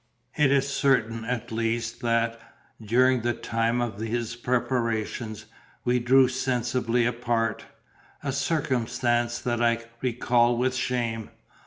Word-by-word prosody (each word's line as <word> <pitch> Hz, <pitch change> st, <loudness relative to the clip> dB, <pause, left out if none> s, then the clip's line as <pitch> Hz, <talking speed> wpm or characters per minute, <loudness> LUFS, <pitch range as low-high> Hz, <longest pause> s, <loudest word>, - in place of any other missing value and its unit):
It 145 Hz, -3 st, +3 dB
is 140 Hz, 0 st, +3 dB
certain 115 Hz, -5 st, +1 dB
at 120 Hz, -2 st, -3 dB
least 115 Hz, 0 st, -2 dB
that, 115 Hz, -1 st, +1 dB, 0.4 s
during 125 Hz, +3 st, +3 dB
the 120 Hz, +1 st, 0 dB
time 115 Hz, +1 st, 0 dB
of 110 Hz, -4 st, -3 dB
his 115 Hz, +1 st, -2 dB
preparations, 120 Hz, -3 st, -2 dB, 0.4 s
we 125 Hz, 0 st, +2 dB
drew 130 Hz, +2 st, +5 dB
sensibly 125 Hz, -2 st, 0 dB
apart 120 Hz, -2 st, -1 dB, 0.6 s
a 140 Hz, -, -1 dB
circumstance 120 Hz, -4 st, 0 dB
that 120 Hz, -1 st, -1 dB
I 115 Hz, 0 st, +2 dB, 0.2 s
recall 120 Hz, -1 st, +2 dB
with 130 Hz, +1 st, +1 dB
shame. 120 Hz, -3 st, -2 dB
120 Hz, 120 wpm, -26 LUFS, 115-125 Hz, 0.6 s, drew